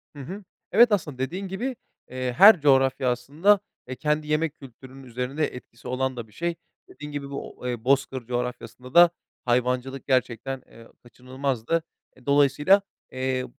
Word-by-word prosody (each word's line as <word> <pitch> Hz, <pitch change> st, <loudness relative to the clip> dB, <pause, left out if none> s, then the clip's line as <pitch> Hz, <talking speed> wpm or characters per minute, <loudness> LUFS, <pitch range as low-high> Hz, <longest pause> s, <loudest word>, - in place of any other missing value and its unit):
Hı -, -, -10 dB
hı. 195 Hz, +8 st, -8 dB, 0.3 s
Evet, 235 Hz, +2 st, +6 dB
aslında 155 Hz, -10 st, -1 dB
dediğin 175 Hz, +10 st, -3 dB
gibi, 235 Hz, +8 st, -3 dB, 0.3 s
eee, 130 Hz, 0 st, -3 dB
her 200 Hz, -3 st, +9 dB
coğrafya 135 Hz, -2 st, +3 dB
aslında, 150 Hz, -, +2 dB, 0.3 s
eee, 130 Hz, -, -5 dB
kendi 150 Hz, +3 st, -1 dB
yemek 155 Hz, 0 st, 0 dB
kültürünün 135 Hz, 0 st, -13 dB
üzerinde 125 Hz, +5 st, -2 dB
etkisi 125 Hz, -1 st, -12 dB
olan 130 Hz, 0 st, -2 dB
da 115 Hz, -2 st, -6 dB
bir 105 Hz, -, -22 dB
şey. 170 Hz, +5 st, -2 dB, 0.3 s
Dediğin 150 Hz, 0 st, -10 dB
gibi, 140 Hz, -1 st, -5 dB
bu 140 Hz, -, -7 dB
o 120 Hz, -2 st, -4 dB
bozkır 135 Hz, -1 st, +1 dB
coğrafyasında 125 Hz, +1 st, -5 dB
da 175 Hz, 0 st, +8 dB, 0.4 s
hayvancılık 125 Hz, +2 st, -1 dB
gerçekten, 130 Hz, 0 st, -1 dB
ııı, 115 Hz, 0 st, -16 dB
kaçınılmazdı. 130 Hz, +4 st, -3 dB, 0.3 s
E, 130 Hz, -, -21 dB
dolayısıyla, 145 Hz, +7 st, +4 dB, 0.3 s
eee, 130 Hz, 0 st, -2 dB
135 Hz, 150 wpm, -25 LUFS, 125-150 Hz, 0.4 s, her